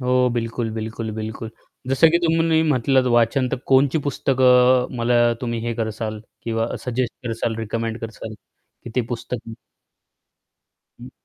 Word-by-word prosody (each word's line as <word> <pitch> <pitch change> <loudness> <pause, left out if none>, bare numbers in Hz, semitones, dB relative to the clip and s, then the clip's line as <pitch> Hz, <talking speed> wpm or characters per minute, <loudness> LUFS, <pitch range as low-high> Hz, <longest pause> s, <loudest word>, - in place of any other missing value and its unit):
हो, 125 0 +2
बिलकुल, 115 -1 -2
बिलकुल, 110 0 -4
बिलकुल. 110 +1 -6 0.4
जसं 155 +5 +5
की 170 - +3
तुम्ही 165 0 +3
म्हटलं 130 -3 +2
वाचन 120 +3 +3
तर - - -1
कोणती 135 +3 +4
पुस्तकं 125 -2 +3
मला 120 +1 +2 0.2
तुम्ही 120 -2 -3
हे 115 - -1
कराल 110 -1 -4 0.2
किंवा 115 -1 -1 0.2
सजेस्ट 125 -1 -1
कराल, 115 0 -2
रिकमेंड 115 +1 -3
कराल, 110 -1 -7 0.5
की 120 - -7
ते 125 - 0
पुस्तक 115 -1 -6 1.5
हं. - - -10
120 Hz, 135 wpm, -22 LUFS, 115-130 Hz, 1.5 s, जसं